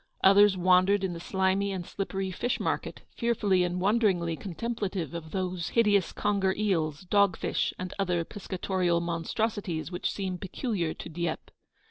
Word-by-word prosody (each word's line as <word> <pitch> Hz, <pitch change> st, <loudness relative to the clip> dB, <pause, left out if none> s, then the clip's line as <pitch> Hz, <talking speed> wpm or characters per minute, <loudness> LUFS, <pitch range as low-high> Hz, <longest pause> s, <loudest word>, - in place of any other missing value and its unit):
Others 195 Hz, 0 st, +6 dB
wandered 185 Hz, +2 st, +4 dB
in 185 Hz, -2 st, -1 dB
the 170 Hz, -, -6 dB
slimy 190 Hz, +2 st, 0 dB
and 185 Hz, -3 st, -4 dB
slippery 195 Hz, 0 st, -3 dB
fish 240 Hz, +7 st, -1 dB
market, -, -, -3 dB
fearfully 210 Hz, -6 st, +2 dB
and 180 Hz, 0 st, -1 dB
wonderingly 190 Hz, -5 st, +2 dB
contemplative 195 Hz, -, -4 dB
of 165 Hz, -2 st, -6 dB
those 185 Hz, -1 st, -2 dB
hideous 205 Hz, -5 st, +3 dB
conger 195 Hz, -2 st, 0 dB
eels, 165 Hz, -8 st, 0 dB
dog 200 Hz, 0 st, +3 dB
fish, -, -, 0 dB
and 185 Hz, 0 st, -5 dB
other 180 Hz, -3 st, 0 dB
piscatorial 185 Hz, -3 st, -1 dB
monstrosities 170 Hz, 0 st, -2 dB
which 175 Hz, -, -2 dB
seem 190 Hz, -3 st, -3 dB
peculiar 190 Hz, -, -2 dB
to -, -, -8 dB
Dieppe. 170 Hz, 0 st, -4 dB
185 Hz, 145 wpm, -28 LUFS, 175-200 Hz, -, Others